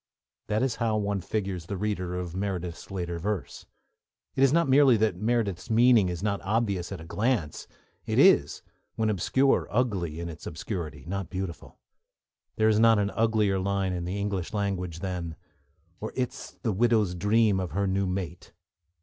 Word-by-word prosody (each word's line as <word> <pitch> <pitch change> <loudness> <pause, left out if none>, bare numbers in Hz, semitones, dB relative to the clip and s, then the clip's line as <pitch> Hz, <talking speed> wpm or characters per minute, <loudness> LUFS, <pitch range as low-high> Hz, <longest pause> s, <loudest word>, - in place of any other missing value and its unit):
That 105 +3 +1
is 130 -3 0
how 115 -2 +1
one 100 -2 -1
figures 95 -4 -3
the 100 - -3
reader 90 -3 -2
of 90 -1 -5
Meredith's 90 -3 -4
later 85 -3 -4
verse. 100 +2 -4 0.7
It - - 0
is 135 - +5
not 170 +1 +3
merely 135 -2 +6
that 110 -3 +1
Meredith's 105 -3 -1
meaning 115 -3 +5
is 90 +1 -4
not 100 -2 0
obvious 100 -4 -1
at 95 - -5
a 80 - -10
glance, 105 - -1 0.4
it - - -1
is, - - +5 0.3
when 110 -1 +1
obscure, 130 +8 +2
ugly 100 -9 -1
in 85 - -4
its 85 -1 -8
obscurity, 80 - -5
not 95 0 -4
beautiful. 95 -4 -6 0.8
There 110 - +3
is 110 -1 +4
not 115 -1 +6
an 100 -1 0
uglier 110 -4 +2
line 95 -1 0
in 90 -1 -3
the 95 +3 -3
English 100 -3 -3
language 90 -5 -2
than: 90 -4 -4 0.6
Or 110 - -5
is't 130 +1 -4
the 115 - +1
widowed's 110 -3 +2
dream 105 +2 +2
of 90 -2 -4
her 100 +2 +1
new 95 0 0
mate. 90 -2 -5
100 Hz, 170 wpm, -27 LUFS, 90-110 Hz, 0.8 s, merely